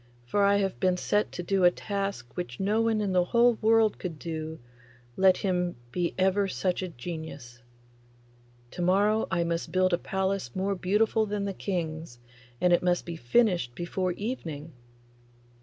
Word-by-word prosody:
for 200 Hz, +12 st, 0 dB
I 200 Hz, 0 st, +5 dB
have 195 Hz, -2 st, -1 dB
been 185 Hz, -1 st, +2 dB
set 205 Hz, +3 st, 0 dB
to 175 Hz, -, -4 dB
do 190 Hz, +1 st, +1 dB
a 175 Hz, -, +8 dB
task 195 Hz, -, -4 dB
which 150 Hz, -9 st, -5 dB
no 210 Hz, +3 st, +1 dB
one 225 Hz, -1 st, +1 dB
in 200 Hz, -2 st, -1 dB
the 180 Hz, -1 st, +3 dB
whole 235 Hz, +3 st, +3 dB
world 225 Hz, -1 st, +3 dB
could 170 Hz, -4 st, -5 dB
do, 160 Hz, -1 st, -5 dB, 0.6 s
let 190 Hz, -1 st, +5 dB
him 180 Hz, -2 st, -1 dB, 0.2 s
be 175 Hz, +2 st, -1 dB
ever 190 Hz, +1 st, +2 dB
such 185 Hz, -1 st, -1 dB
a 185 Hz, -, -3 dB
genius! 145 Hz, -5 st, -8 dB, 1.1 s
To 180 Hz, -, -6 dB
morrow 205 Hz, +5 st, +3 dB
I 170 Hz, -2 st, +1 dB
must 170 Hz, 0 st, -2 dB
build 185 Hz, 0 st, +2 dB
a 175 Hz, -, +2 dB
palace 190 Hz, -9 st, -2 dB
more 195 Hz, +1 st, 0 dB
beautiful 210 Hz, +4 st, +1 dB
than 205 Hz, -1 st, -2 dB
the 200 Hz, -, -2 dB
King's, 160 Hz, -8 st, -4 dB, 0.4 s
and 180 Hz, -1 st, +3 dB
it 175 Hz, -, +4 dB
must 180 Hz, -1 st, +1 dB
be 170 Hz, -, -5 dB
finished 165 Hz, -, +1 dB
before 180 Hz, +2 st, -2 dB
evening. 165 Hz, -, -5 dB
185 Hz, 170 wpm, -28 LUFS, 170-200 Hz, 1.1 s, a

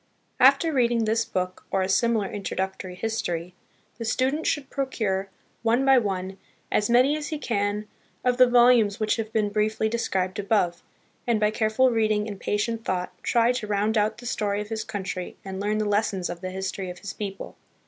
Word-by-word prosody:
After 275 Hz, +5 st, +5 dB
read 245 Hz, -4 st, +3 dB
ing 230 Hz, -2 st, +1 dB
this 225 Hz, +1 st, +2 dB
book, 185 Hz, -4 st, -3 dB
or 190 Hz, -, +1 dB
a -, -, -1 dB
similar 220 Hz, +1 st, +2 dB
introductory 190 Hz, -2 st, -4 dB
history, 180 Hz, -5 st, -3 dB, 0.5 s
the -, -, -3 dB
stu 255 Hz, +4 st, +1 dB
dent 310 Hz, +3 st, -3 dB
should 290 Hz, -3 st, -1 dB
procure, 210 Hz, -8 st, -1 dB, 0.3 s
one 235 Hz, +4 st, +2 dB
by 270 Hz, -1 st, +6 dB
one, 190 Hz, -3 st, -3 dB, 0.3 s
as 210 Hz, -, +1 dB
many 255 Hz, +5 st, +5 dB
as 305 Hz, -1 st, -4 dB
he 310 Hz, -, -3 dB
can 210 Hz, -5 st, -1 dB, 0.4 s
of 250 Hz, -1 st, +2 dB
the 255 Hz, -1 st, +7 dB
volumes 240 Hz, -4 st, +5 dB
which 215 Hz, +1 st, +1 dB
have 220 Hz, -1 st, -4 dB
been 215 Hz, -2 st, +1 dB
briefly 215 Hz, +1 st, 0 dB
described 190 Hz, -4 st, -1 dB
above, 195 Hz, -4 st, +1 dB, 0.5 s
and, 235 Hz, -3 st, +2 dB
by 210 Hz, 0 st, +2 dB
careful 220 Hz, +4 st, +2 dB
reading 215 Hz, -2 st, +1 dB
and 205 Hz, -2 st, -6 dB
patient 225 Hz, +2 st, -1 dB
thought, 180 Hz, -3 st, -2 dB
try 235 Hz, 0 st, +3 dB
to 240 Hz, -4 st, -3 dB
round 210 Hz, +2 st, +1 dB
out 215 Hz, 0 st, +1 dB
the 245 Hz, -, -11 dB
story 205 Hz, -4 st, -1 dB
of 210 Hz, 0 st, -5 dB
his 220 Hz, -1 st, -3 dB
country 190 Hz, -3 st, -5 dB
and 190 Hz, 0 st, -5 dB
learn 210 Hz, +2 st, 0 dB
the 215 Hz, -, 0 dB
lessons 205 Hz, -3 st, 0 dB
of 170 Hz, -, -8 dB
the 185 Hz, -, -4 dB
history 190 Hz, 0 st, -4 dB
of 180 Hz, -, -7 dB
his 195 Hz, +1 st, -7 dB
people. 195 Hz, -2 st, -6 dB
215 Hz, 195 wpm, -25 LUFS, 195-235 Hz, 0.5 s, the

